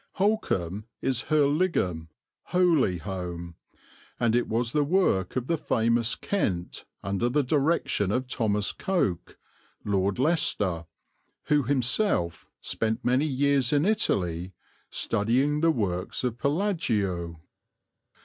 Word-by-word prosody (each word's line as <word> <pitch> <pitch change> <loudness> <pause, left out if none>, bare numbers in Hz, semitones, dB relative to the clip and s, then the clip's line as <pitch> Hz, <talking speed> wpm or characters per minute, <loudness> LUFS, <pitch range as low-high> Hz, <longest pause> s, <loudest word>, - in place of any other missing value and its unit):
Holkham 110 - 0
is 130 -3 -1
Hoeligham, 145 - +1 0.4
"Holy 165 - +2
Home," 85 -1 -6 0.7
and 115 -1 +2
it 120 - +1
was 115 +1 0
the 150 +2 +2
work 145 - +1
of 125 -2 -1
the 165 +2 -1
famous 115 -1 +1
Kent 95 - -2 0.2
under 100 +5 0
the 145 +3 +2
direction 140 - +1
of 125 +3 -1
Thomas 105 -4 0
Coke, 170 - -2 0.5
Lord 100 -1 +1
Leicester, 105 - +1 0.6
who 150 -1 +4
himself 130 - 0
spent 110 +2 -2
many 130 +5 +2
years 140 -2 +2
in 145 +2 +3
Italy 95 - 0 0.4
studying 130 +8 +1
the 165 - +4
works 100 - -1
of 120 -1 -2
Palladio. 110 - -1
120 Hz, 110 wpm, -27 LUFS, 95-150 Hz, 0.7 s, who